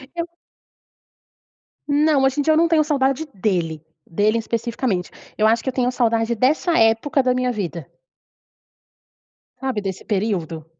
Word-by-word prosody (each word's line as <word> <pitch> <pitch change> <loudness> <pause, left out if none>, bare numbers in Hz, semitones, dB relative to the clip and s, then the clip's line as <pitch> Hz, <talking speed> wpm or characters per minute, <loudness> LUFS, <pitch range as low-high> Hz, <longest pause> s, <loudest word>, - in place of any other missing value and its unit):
Eu 340 0 -3 1.6
Não, 295 -1 +3
hoje 270 +2 +1
em - - +2
dia 315 - +3
eu - - +3
não 335 +1 +4
tenho 325 -2 +3
saudade 275 0 0
dele, 175 -6 -2 0.2
dele 210 +6 +1
especificamente. 230 -4 -2 0.3
Eu 215 - +3
acho 225 +1 +3
que - - -1
eu - - -4
tenho 250 -1 +1
saudade 230 -2 +1
dessa 305 - +2
época 225 +6 +3
da 255 -1 +1
minha 250 0 0
vida. 175 - -4 1.7
Sabe, 260 -5 -2
desse 190 -2 -5
período? 185 -7 -2
235 Hz, 145 wpm, -21 LUFS, 205-275 Hz, 1.7 s, não